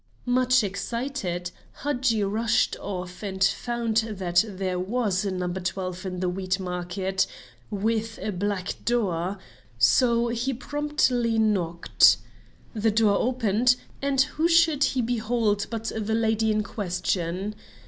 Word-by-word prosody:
Much 255 Hz, 0 st, +3 dB
excited, 200 Hz, -3 st, -3 dB, 0.3 s
Hadji 250 Hz, -6 st, +1 dB
rushed 220 Hz, +4 st, +1 dB
off 180 Hz, -2 st, -6 dB
and 190 Hz, -2 st, -2 dB
found 230 Hz, +2 st, 0 dB
that 195 Hz, -5 st, +2 dB
there 185 Hz, -2 st, -3 dB
was 200 Hz, 0 st, 0 dB
a -, -, 0 dB
No. 185 Hz, -1 st, -2 dB
12 185 Hz, +1 st, -3 dB
in 180 Hz, -1 st, -4 dB
the 185 Hz, -, 0 dB
Wheat 185 Hz, +1 st, -1 dB
Market, 185 Hz, +1 st, -2 dB, 0.4 s
with 225 Hz, +2 st, -1 dB
a 215 Hz, -, -3 dB
black 200 Hz, 0 st, -3 dB
door, 195 Hz, -6 st, 0 dB, 0.4 s
so 235 Hz, -, +4 dB
he 240 Hz, +3 st, -1 dB
promptly 255 Hz, -4 st, 0 dB
knocked. 185 Hz, -6 st, +4 dB, 0.6 s
The 220 Hz, 0 st, +1 dB
door 215 Hz, -1 st, +3 dB
opened, 245 Hz, -1 st, +2 dB, 0.3 s
and 275 Hz, -1 st, 0 dB
who 310 Hz, +4 st, +1 dB
should 330 Hz, -4 st, +4 dB
he 255 Hz, -3 st, 0 dB
behold 225 Hz, -3 st, 0 dB
but 225 Hz, -1 st, -3 dB
the 220 Hz, 0 st, -1 dB
lady 220 Hz, -1 st, +2 dB
in 215 Hz, 0 st, +1 dB
question? 190 Hz, -1 st, -2 dB
215 Hz, 130 wpm, -26 LUFS, 185-240 Hz, 0.6 s, so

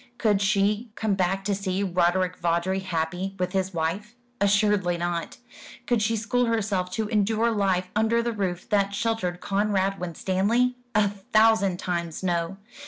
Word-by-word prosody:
Could 210 Hz, -3 st, +2 dB
she 205 Hz, +3 st, +1 dB
come 215 Hz, -2 st, 0 dB
back 190 Hz, 0 st, 0 dB
to 205 Hz, -, +1 dB
see 195 Hz, 0 st, -2 dB
Roderick 180 Hz, 0 st, +1 dB
Vawdrey 170 Hz, +3 st, 0 dB
happy 180 Hz, +1 st, -3 dB
with 180 Hz, -1 st, -1 dB
his 190 Hz, -1 st, -1 dB
wife? 185 Hz, +7 st, -3 dB, 0.2 s
Assuredly 200 Hz, -3 st, +2 dB
not. 170 Hz, -1 st, -3 dB, 0.5 s
Could 240 Hz, -3 st, +1 dB
she 225 Hz, +2 st, +1 dB
school 245 Hz, +3 st, 0 dB
herself 200 Hz, -5 st, 0 dB
to 220 Hz, +1 st, -1 dB
endure 220 Hz, +2 st, +2 dB
life 190 Hz, -4 st, 0 dB
under 225 Hz, +2 st, +2 dB
the 235 Hz, 0 st, -1 dB
roof 185 Hz, -4 st, -3 dB
that 200 Hz, -1 st, +1 dB
sheltered 225 Hz, -6 st, -1 dB
Conrad 195 Hz, -1 st, 0 dB
Winstanley? 195 Hz, +8 st, 0 dB, 0.2 s
A 210 Hz, -1 st, +4 dB
thousand 205 Hz, -1 st, +2 dB
times 170 Hz, -2 st, -3 dB
no. 175 Hz, +1 st, -1 dB
195 Hz, 150 wpm, -25 LUFS, 180-215 Hz, 0.5 s, A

